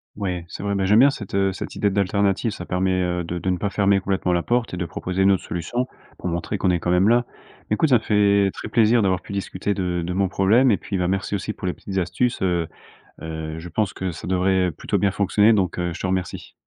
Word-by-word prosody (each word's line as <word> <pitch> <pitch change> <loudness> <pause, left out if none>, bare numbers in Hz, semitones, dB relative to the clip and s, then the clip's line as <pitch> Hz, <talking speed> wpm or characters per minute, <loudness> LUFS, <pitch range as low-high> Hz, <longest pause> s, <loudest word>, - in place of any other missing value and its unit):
Ouais, 90 -4 -3
c'est - - -8
vrai, 100 0 -1
mais 95 -1 0
j'aime 105 +2 +5
bien 140 +2 +7
cette, 100 -6 -7
heu, 95 0 +2
cette - - -7
idée 100 - +1
d'alternative, 100 +3 +1
ça 90 -4 -6
permet, 95 0 0
heu, 90 -1 -1
de 85 +1 -4
de 95 - -2
ne 90 - 0
pas 100 +2 -2
fermer 100 -1 +2
complètement 95 -2 -1
la 85 - +2
porte 120 0 -1
et - - -3
de 90 - -2
proposer 90 +3 -3
une 100 +1 +5
autre 95 - +1
solution 105 +10 -3 0.3
pour - - -5
montrer 85 +4 -2
qu'on 95 -1 +1
est 85 - +1
quand 85 - -3
même 90 +3 +4
là. 120 +1 +4 0.4
Écoute, 125 +9 +2
ça 125 - +6
me - - -18
fait 100 -2 +3
très - - -7
plaisir 115 0 +3
d'avoir 95 -2 +1
pu - - -11
discuter 100 0 -2
de 90 -2 -1
de 90 +2 -3
mon 95 +1 +1
problème 110 +7 +3
et 100 - +3
puis, 95 +2 -4
bah 90 -1 0
merci 95 +2 -1
aussi 100 +2 -3
pour 95 - -6
les 90 - 0
petites 95 -1 -4
astuces, 95 +8 -1
heu 85 -3 0 0.6
heu, 80 -1 -5
je 85 +2 -8
pense 105 +3 0
que 95 -1 -3
ça 80 - -8
devrait, 95 0 +2
heu, 90 - -2
plutôt - - -2
bien 100 - +2
fonctionner, 105 +2 +3
donc 95 -5 0
heu, 90 -1 -1
je - - -8
te - - -3
remercie! 95 -1 -3
95 Hz, 265 wpm, -22 LUFS, 90-100 Hz, 0.6 s, bien